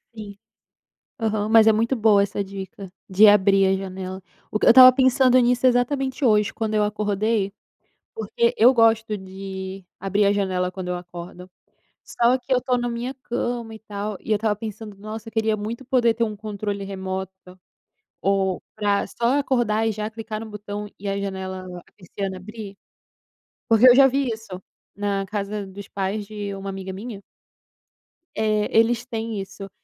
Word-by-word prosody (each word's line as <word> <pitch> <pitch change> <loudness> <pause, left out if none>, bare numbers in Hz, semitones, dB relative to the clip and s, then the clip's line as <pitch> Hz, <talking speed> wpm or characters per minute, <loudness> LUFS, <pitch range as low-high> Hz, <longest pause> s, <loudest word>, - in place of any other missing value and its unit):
Sim. 205 -2 -9 0.8
Aham, 215 -2 -1
mas 220 0 +6
é 220 - +7
muito 230 +4 +1
boa 215 -2 +4
essa 200 0 -2
dica 195 -1 -9 0.2
de 200 +3 +6
abrir 195 -1 +5
a 190 - +3
janela. 190 0 -6 0.3
Eu 215 - +1
estava 255 +1 +10
pensando 260 -1 +4
nisso 245 +1 +3
exatamente 265 +2 +1
hoje 210 -3 +3
quando 220 -1 -3
eu 210 -1 +3
acordei, 210 0 -1 0.6
porque 225 +2 0
eu 245 +4 +6
gosto 225 -2 +3
de 190 0 -7 0.2
abrir 200 +2 +1
a 200 - +4
janela 185 -2 -1
quando 185 -1 -6
eu 180 - -1
acordo. 175 +1 -10 0.6
Só 240 +2 +2
que 255 +1 -5
eu 255 - +5
estou 250 0 0
na 240 0 -2
minha 240 +3 -4
cama 240 -3 -4
e - - -10
tal 210 -1 -5
e - - -9
eu - - +4
estava 210 0 0
pensando: 215 -1 -8
"Nossa, 220 +2 -8
queria 220 -1 0
muito 230 +5 -5
poder 240 -2 +2
ter 230 +1 +1
um 215 -2 -5
controle 205 -1 -4
remoto, 190 -1 -5 0.9
ou 190 -1 0
para 205 -1 +1
só 240 +4 0
acordar 235 -5 +1
e 225 - +1
já 210 +1 -4
clicar 220 -1 -6
no 225 - -7
botão 205 0 -6
e 200 - -5
a 195 0 -1
janela 190 -1 -5 0.3
persiana 190 0 -5
abrir." 200 +1 -9 0.9
Porque 225 +3 +7
eu 245 - +8
já 275 +1 +7
vi 270 0 0
isso 220 -5 -6 0.3
na 200 -1 -2
casa 205 0 -4
dos 200 +1 -10
pais 200 +1 -3
de 205 -1 -5
uma 195 0 -7
amiga 190 0 -6
minha 200 +1 -8 1.1
eh, 215 -1 +1
eles 230 +2 +3
têm 225 -4 -4
isso, 195 0 -9
210 Hz, 165 wpm, -23 LUFS, 195-230 Hz, 1.1 s, estava